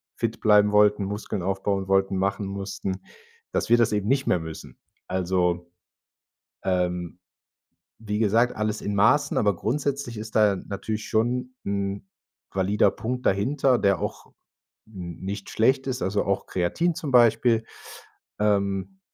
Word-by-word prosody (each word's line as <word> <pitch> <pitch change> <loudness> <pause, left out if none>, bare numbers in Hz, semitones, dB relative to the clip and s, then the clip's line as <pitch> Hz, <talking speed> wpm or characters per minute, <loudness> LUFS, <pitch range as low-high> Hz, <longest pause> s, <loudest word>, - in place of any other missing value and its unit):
fit 115 -1 -2
bleiben 105 -1 +5
wollten, 105 0 +4
Muskeln 105 -1 -4
aufbauen 95 +1 -1
wollten, 95 0 +2
machen 100 +2 -1
mussten, 100 -1 -4 0.5
dass - - -1
wir 120 - +6
das 115 -1 +3
eben 105 -1 -1
nicht 135 +2 +1
mehr 90 - +3
müssen. 80 -1 -9 0.3
Also, 90 -1 0 0.9
ähm, 90 -1 -1 0.8
wie 105 -1 -3
gesagt, 115 +3 +2
alles 110 0 -2
in 100 - -3
Maßen, 140 +8 +3
aber 100 -2 +2
grundsätzlich 135 +2 -2
ist 110 +1 -8
da 105 -2 +4
natürlich 105 +3 -5
schon 125 +3 0
'n 100 0 -3 0.5
valider 100 +2 +3
Punkt 125 +5 -4
dahinter, 130 +6 +2
der 100 -2 +2
auch - - -5 0.6
n 90 -6 -8
nicht 100 +1 -5
schlecht 130 +4 +2
ist, 130 -1 -2
also 100 +2 0
auch 100 0 -1
Kreatin 160 - 0
zum 150 -3 -4
Beispiel, 115 -1 +4 0.7
ähm, 100 - 0
105 Hz, 140 wpm, -25 LUFS, 95-115 Hz, 0.9 s, wir